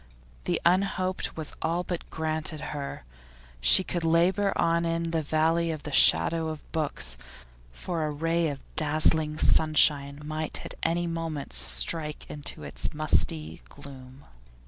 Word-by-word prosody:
The - - 0
unhoped 185 0 0
was 155 -2 -3
all 170 +2 -1
but 175 -1 -6
granted 155 0 -3
her. 140 - -6 0.6
She 190 - +7
could 175 -2 -3
labour 175 +5 +2
on 170 0 +1
in 165 0 -2
the 165 -1 0
valley 160 +2 +1
of 155 -2 -5
the 150 - -6
shadow 160 - +4
of 155 -1 -6
books, 140 - -1 0.5
for 165 - -4
a 155 - -1
ray 165 +3 0
of 140 -2 -5
dazzling 155 0 +2
sunshine 145 -3 +3
might 155 0 -3
at - - -7
any 170 +1 0
moment 165 - -5
strike 150 - +1
into 145 -1 -5
its - - -3
musty 80 - 0
gloom. 130 0 -13
155 Hz, 140 wpm, -27 LUFS, 145-165 Hz, 0.6 s, She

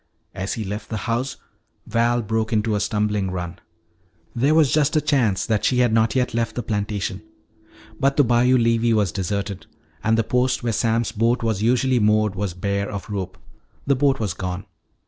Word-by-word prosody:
As 95 +1 -3
he 110 - -3
left 105 +2 -6
the 110 - -3
house 125 +2 -2 0.5
Val 120 +1 +1
broke 110 +1 -1
into 110 0 +1
a 105 - +1
stumbling 105 -1 0
run. 90 -1 -5 0.8
There 140 +6 +2
was 150 -6 +4
just 150 0 +2
a - - +5
chance 125 -10 +1
that 110 -2 0
she 125 - +2
had 120 -3 +3
not 110 +1 +2
yet 125 -2 +1
left 115 0 -1
the 120 - -3
plantation. 100 -2 -3 0.8
But 135 +1 +1
the 145 - +6
bayou 125 +1 +3
levee 115 0 +2
was 105 -5 +2
deserted. 100 +1 -3 0.4
And 110 0 +2
the 115 - +2
post 125 +2 0
where 115 -1 0
Sam's 115 +1 +1
boat 115 +3 +1
was 110 -3 0
usually 125 +2 +2
moored 105 -1 +2
was 100 -3 -3
bare 100 +2 -2
of 100 +1 -6
rope; 95 -1 -4 0.5
the 140 - +3
boat 135 0 +2
was 105 -6 -1
gone. 90 +1 -5
110 Hz, 185 wpm, -22 LUFS, 100-120 Hz, 0.8 s, the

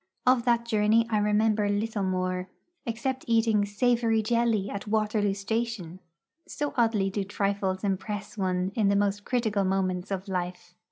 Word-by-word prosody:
Of 250 -1 +4
that 235 -1 +2
journey 220 0 +3
I 215 - +3
remember 210 0 +2
little 210 +1 -1
more, 185 -1 -1 0.4
except 255 +3 -2
eating 225 -3 +3
savoury 225 +1 +1
jelly 230 -3 +1
at 200 +1 -6
Waterloo 210 -2 +1
Station 205 -4 -3 0.5
so 290 -1 -3
oddly 225 -6 +2
do 200 0 -1
trifles 195 -1 -1
impress 200 +1 -3
one 185 -2 -1
in 210 -3 +2
the 200 - +3
most 205 0 0
critical 220 -5 0
moments 185 -1 -1
of 195 0 -4
life. 180 -1 -4
205 Hz, 150 wpm, -27 LUFS, 195-225 Hz, 0.5 s, Of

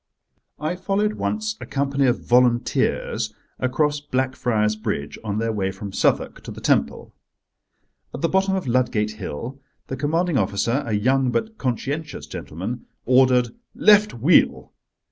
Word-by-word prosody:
I 155 +4 -2
followed 200 +3 0
once 215 0 -2
a - - -7
company 140 -1 +1
of 125 - 0
Volunteers 120 -1 +1 0.2
across 145 +3 +1
Blackfriars 125 -6 0
Bridge 105 -10 -4
on 105 -2 -2
their 115 +1 0
way 95 -2 -1
from 100 0 -7
Southwark - - +1
to - - -7
the - - -8
Temple. - - 0 1.0
At - - -7
the 165 - +3
bottom 190 +2 +2
of 190 - -2
Ludgate 120 -4 +1
Hill 115 - -6 0.3
the 130 - -2
commanding 160 +3 +1
officer, 105 +7 0
a 110 - -1
young 130 +5 +2
but 220 - -2
conscientious 140 +4 -3
gentleman, 90 - -6 0.2
ordered 125 -1 +4 0.3
"Left 210 0 +5
wheel!" 140 +9 +3
130 Hz, 140 wpm, -23 LUFS, 110-150 Hz, 1.0 s, Left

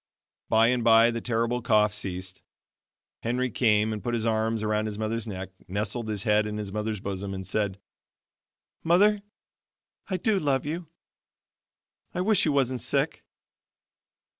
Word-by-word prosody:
By 115 +1 +5
and 125 -1 +1
by 115 +1 +6
the 115 0 -4
terrible 115 +1 0
cough 105 -3 +3
ceased. 95 -2 -4 0.8
Henry 125 +2 -1
came 110 -1 +2
and 105 - -5
put 120 -1 -1
his 115 -1 -2
arms 110 0 0
around 110 0 0
his 105 -1 -4
mother's 110 +1 -2
neck, 95 -2 -5 0.2
nestled 105 +4 -3
his 105 -2 -1
head 105 0 +3
in 105 0 -4
his 100 -2 -5
mother's 105 0 -2
bosom, 100 0 -4
and 95 0 -6
said, 100 -2 -1 1.0
"Mother, 200 +5 +4 0.9
I 185 - 0
do 205 +2 +1
love 140 -5 0
you; 165 +3 -4 1.3
I 180 - 0
wish 205 0 +3
you 155 - +2
wasn't 130 -3 +1
sick." 140 +5 -1
110 Hz, 150 wpm, -27 LUFS, 105-125 Hz, 1.3 s, by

